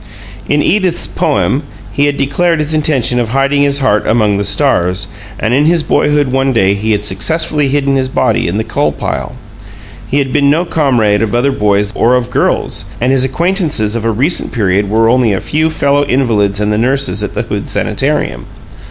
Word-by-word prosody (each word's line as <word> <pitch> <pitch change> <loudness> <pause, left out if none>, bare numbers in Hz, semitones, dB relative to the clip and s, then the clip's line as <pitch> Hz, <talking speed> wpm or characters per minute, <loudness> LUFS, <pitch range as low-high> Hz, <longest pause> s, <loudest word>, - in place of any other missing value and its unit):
In 145 0 +2
"Edith's" 185 - +1
poem 95 - 0 0.3
he 145 +2 +1
had 145 -1 -1
declared 165 +5 0
his 150 0 -2
intention 140 -6 +1
of 120 -2 -1
hiding 135 +3 +1
his 140 0 +1
heart 105 -6 +1
"among 105 -3 +1
the - - 0
stars"; 100 -5 +1 0.3
and 110 - -1
in 145 +3 +3
his 165 -1 +2
boyhood 145 -3 +1
one 135 0 +1
day 100 -4 +2
he 105 +2 -2
had 105 0 -2
successfully 150 - 0
hidden 140 0 0
his 130 -1 0
body - - 0
in 90 +4 -2
the 110 - -1
coal - - -1
pile. - - -5 0.7
He 140 - -1
had 135 -2 -1
been 140 -1 +3
no 165 +5 +1
comrade 120 -11 +1
of 110 0 -1
other 130 +4 +1
boys 105 -3 0
or 120 +2 +2
of 125 -1 -2
girls, - - -1
and 125 +2 +1
his 135 -1 +2
acquaintances 150 - -1
of 115 - -3
a 115 - 0
recent 135 +10 0
period 100 -3 0
were 110 +2 +2
only 120 -2 +2
a 95 - -1
few 155 +2 -1
fellow 145 -2 +1
invalids 110 -7 0
and 105 0 0
the 105 - 0
nurses 130 -4 0
at - - -5
the - - -1
Hood - - -5
Sanitarium. - - -2
130 Hz, 195 wpm, -12 LUFS, 105-145 Hz, 0.7 s, in